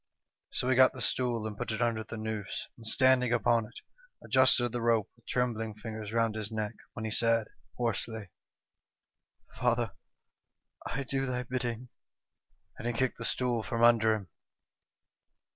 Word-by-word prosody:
" - - -61
So 125 - 0
he 130 - +4
got 130 +1 +7
the - - -9
stool 120 -3 0
and 110 -1 -4
put 105 - -3
it 110 - -2
under 115 -2 +1
the 110 +1 -7
noose, 110 -2 -4
and 115 -2 -9
standing 130 0 +4
upon 115 -1 +3
it, 120 - -12 0.4
adjusted 130 -2 +4
the 120 0 -2
rope 115 -3 +2
with - - -28
trembling 115 -3 -1
fingers 110 -1 -6
round 115 -1 +2
his 110 0 -4
neck, 110 -1 -2 0.2
when 110 - -5
he 110 - -2
said, 115 0 +2 0.3
hoarsely: 110 -4 -2 0.6
' - - -31
Father, 120 -3 +2 1.0
I 135 +3 -2
do 135 0 -1
thy 125 0 -1
bidding,' 125 -1 -3 0.9
and 115 - -3
he 120 - 0
kicked 130 +1 0
the 115 - -4
stool 120 -2 0
from 115 +1 -1
under 115 -2 +6
him. 100 -5 -7
115 Hz, 165 wpm, -31 LUFS, 110-125 Hz, 1.0 s, got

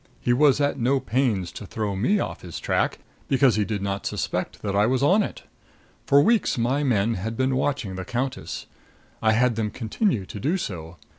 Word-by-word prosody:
He 120 - +1
was 140 +1 +4
at 145 -1 +1
no 130 +3 +2
pains 110 -8 0
to 105 - -9
throw 105 -1 -3
me 160 - +2
off - - -4
his 85 -3 -7
track, - - 0 0.3
because 135 -2 +4
he 105 - +2
did 105 -1 -3
not 100 0 -2
suspect - - -3
that 100 -2 -1
I 105 +2 +4
was 130 +2 +1
on 185 +9 +5
it. - - -5 0.6
For 140 +1 +6
weeks 225 - +2
my 130 +5 +1
men 115 -4 +2
had 110 +3 -4
been 130 0 +1
watching 130 -7 -1
the 95 - -4
countess. 130 +5 -4 0.6
I 110 0 +4
had 120 +1 +3
them 110 -2 0
continue 115 - -1
to 105 - -8
do 155 - 0
so. 85 - -6
120 Hz, 200 wpm, -24 LUFS, 105-135 Hz, 0.6 s, For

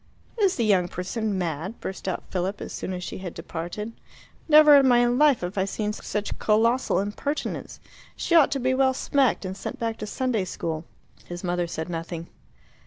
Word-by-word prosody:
"Is 395 -3 +3
the 235 - 0
young 190 -4 +3
person 195 +4 -3
mad?" 175 +4 -3
burst 190 - -6
out 185 - -2
Philip 190 +2 -2
as - - -7
soon - - -4
as 180 -1 -4
she - - -6
had 180 -3 -7
departed. 175 +6 -5 0.6
"Never 300 -1 +9
in 275 -1 +5
my 245 -1 +5
life 255 +2 +4
have 180 +3 -3
I 190 - +2
seen 210 +1 -2
such 210 -1 -4
colossal 230 -1 +2
impertinence. 210 +9 -3 0.4
She - - -2
ought 325 -5 +7
to 275 - -1
be 260 +1 +1
well 260 0 +3
smacked, 265 -6 +1
and 185 0 -4
sent 195 - -6
back 230 -1 -2
to 215 - -5
Sunday 235 -3 -1
school." 160 -2 -4 0.4
His 175 +1 -7
mother 175 -1 0
said 160 -1 -4
nothing. 165 -1 -5
210 Hz, 185 wpm, -25 LUFS, 180-250 Hz, 0.6 s, Never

